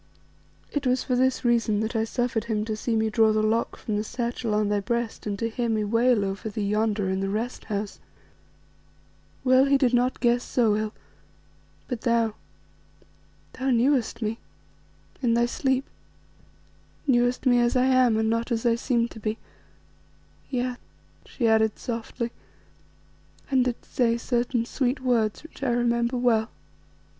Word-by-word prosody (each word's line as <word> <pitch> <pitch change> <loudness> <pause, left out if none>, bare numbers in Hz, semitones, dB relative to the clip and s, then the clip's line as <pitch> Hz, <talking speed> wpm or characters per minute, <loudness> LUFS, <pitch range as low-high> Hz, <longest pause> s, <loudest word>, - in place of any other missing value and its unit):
It 285 -2 -1
was 255 0 +2
for 250 - 0
this 260 0 +1
reason 230 -3 +2
that 220 +2 -3
I 220 0 +1
suffered 235 -1 -1
him 215 -2 -1
to 220 -1 -2
see 225 +2 -2
me 220 0 +1
draw 220 -1 +4
the 215 0 +1
lock 225 +2 0
from 210 -2 -3
the 210 - -1
satchel 235 -1 -2
on 210 0 +2
thy 205 0 +1
breast 235 +2 -3
and 200 -1 -2
to 230 - -1
hear 235 +1 -2
me 215 -1 +1
wail 230 0 +2
over 195 +3 -4
thee 205 -1 -3
yonder 210 -1 0
in 190 0 -1
the 195 0 -1
Rest 225 +5 -3
house. 205 -2 -4 1.4
Well 255 +1 +5
he 275 0 +4
did 255 -3 +2
not 245 +1 +2
guess 240 0 +2
so 225 -4 +2
ill, 215 0 -2 0.9
but 245 -4 -4
thou, 230 -2 +1 1.2
thou 265 +1 -2
knewest 245 -2 +2
me 220 +2 -2 0.8
in 235 -3 +2
thy 235 0 +3
sleep 265 +2 0 1.2
knewest 245 -1 +2
me 245 -1 +5
as 240 +1 +2
I 255 0 +4
am, 255 -4 +4
and 220 0 +1
not 230 +2 -1
as 230 0 -1
I 235 - +4
seemed 235 0 0
to 225 - -10
be, 215 +1 -2 1.1
yes," 250 -1 -2 0.5
she 235 - -1
added 220 -1 +3
softly, 235 0 -4 1.2
"and 260 -2 +3
didst 245 -2 -5
say 235 -2 +2
certain 240 0 0
sweet 255 +1 -1
words 235 -3 +1
which 320 - -14
I 275 - 0
remember 235 +1 +1
well." 230 -2 +2
235 Hz, 165 wpm, -25 LUFS, 220-250 Hz, 1.4 s, Well